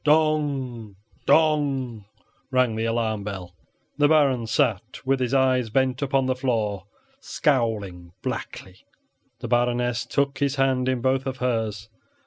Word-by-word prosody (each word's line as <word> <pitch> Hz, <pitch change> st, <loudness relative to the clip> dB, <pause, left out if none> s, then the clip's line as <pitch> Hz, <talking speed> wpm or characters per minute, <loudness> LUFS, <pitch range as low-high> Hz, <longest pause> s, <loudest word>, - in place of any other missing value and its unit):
Dong! 145 Hz, -8 st, +1 dB, 0.3 s
Dong! 140 Hz, -8 st, +2 dB, 0.4 s
rang 130 Hz, -3 st, +2 dB
the 110 Hz, +1 st, -1 dB
alarm 115 Hz, -2 st, -1 dB
bell. 95 Hz, -3 st, -6 dB, 0.5 s
The 145 Hz, -, +5 dB
Baron 140 Hz, -6 st, +3 dB
sat 115 Hz, +3 st, -1 dB
with 135 Hz, 0 st, +1 dB
his 125 Hz, -1 st, -1 dB
eyes 130 Hz, -3 st, +2 dB
bent 130 Hz, +3 st, +1 dB
upon 135 Hz, -1 st, +1 dB
the 130 Hz, -, +1 dB
floor, 110 Hz, -7 st, -1 dB, 0.3 s
scowling 110 Hz, -, -1 dB
blackly. 95 Hz, 0 st, -5 dB, 0.6 s
The -, -, -4 dB
Baroness 120 Hz, 0 st, 0 dB
took 140 Hz, -1 st, 0 dB
his 140 Hz, -1 st, +1 dB
hand 130 Hz, -2 st, +1 dB
in 130 Hz, -2 st, -1 dB
both 130 Hz, +1 st, +1 dB
of 130 Hz, -1 st, -3 dB
hers. 110 Hz, -5 st, -2 dB
125 Hz, 130 wpm, -24 LUFS, 110-135 Hz, 0.6 s, The